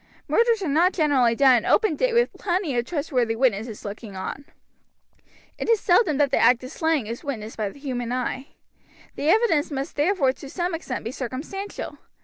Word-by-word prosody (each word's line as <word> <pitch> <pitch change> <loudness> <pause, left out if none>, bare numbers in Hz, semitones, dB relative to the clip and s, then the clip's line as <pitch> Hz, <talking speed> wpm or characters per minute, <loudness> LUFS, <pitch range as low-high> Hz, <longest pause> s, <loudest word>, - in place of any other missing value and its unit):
Murders 460 -3 +2
are - - -2
not 330 +6 +3
generally 270 -8 +3
done 260 -1 +6
in 230 - -2
open 430 -9 +3
day - - +1
with 475 +1 +2
plenty 350 -7 -2
of 240 0 0
trustworthy 255 -7 -1
witnesses 225 -3 -1
looking 205 0 -7
on. 190 +9 -6 1.1
It - - -3
is 455 -2 +4
seldom 350 - +3
that 285 -2 +2
the - - +2
act 245 0 +4
of 255 - -8
slaying 320 -6 0
is 230 +6 -6
witnessed 225 -7 -5
by 215 -2 -1
human 245 -1 -5
eye. 255 +2 -3 0.7
The 295 - -1
evidence 335 -7 +3
must 275 -1 -4
therefore 295 -3 +2
to 275 - -11
some 350 +3 -2
extent 330 -8 -5
be 230 - -3
circumstantial. 280 - -6
280 Hz, 180 wpm, -24 LUFS, 245-345 Hz, 1.1 s, done